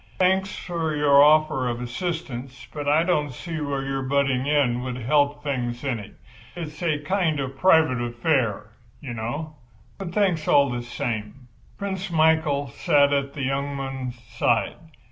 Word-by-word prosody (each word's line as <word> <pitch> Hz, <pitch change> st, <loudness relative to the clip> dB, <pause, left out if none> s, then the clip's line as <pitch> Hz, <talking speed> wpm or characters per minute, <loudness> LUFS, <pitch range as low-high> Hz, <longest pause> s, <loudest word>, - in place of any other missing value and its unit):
Thanks 190 Hz, +1 st, +2 dB
for 165 Hz, -3 st, -3 dB
your 145 Hz, -1 st, +6 dB
offer 150 Hz, -4 st, +4 dB
of 120 Hz, -1 st, -2 dB
assistance—but 135 Hz, 0 st, -5 dB
I 150 Hz, +3 st, +4 dB
don't 150 Hz, -5 st, 0 dB
see 160 Hz, +4 st, -6 dB
where 140 Hz, -2 st, -2 dB
your 135 Hz, 0 st, -2 dB
butting 135 Hz, -1 st, +1 dB
in 135 Hz, -5 st, +2 dB
would 125 Hz, -1 st, -4 dB
help 145 Hz, +4 st, +1 dB
things 125 Hz, -4 st, -3 dB
any. 120 Hz, -7 st, -4 dB, 0.4 s
It's 155 Hz, -3 st, -7 dB
a 160 Hz, -4 st, +1 dB
kind 155 Hz, 0 st, 0 dB
of 135 Hz, 0 st, -4 dB
private 160 Hz, -6 st, +4 dB
affair, 120 Hz, -4 st, 0 dB, 0.3 s
you 135 Hz, -5 st, -7 dB
know—but 140 Hz, -, -7 dB
thanks 180 Hz, -5 st, +1 dB
all 140 Hz, -2 st, +4 dB
the 120 Hz, 0 st, -3 dB
same." 120 Hz, 0 st, -5 dB, 0.3 s
Prince 195 Hz, -1 st, -4 dB
Michael 160 Hz, -3 st, +2 dB
sat 140 Hz, +3 st, +3 dB
at 140 Hz, 0 st, 0 dB
the 140 Hz, -, -4 dB
young 140 Hz, +1 st, -1 dB
man's 135 Hz, -2 st, -5 dB
side. 120 Hz, 0 st, 0 dB
140 Hz, 145 wpm, -24 LUFS, 125-155 Hz, 0.4 s, your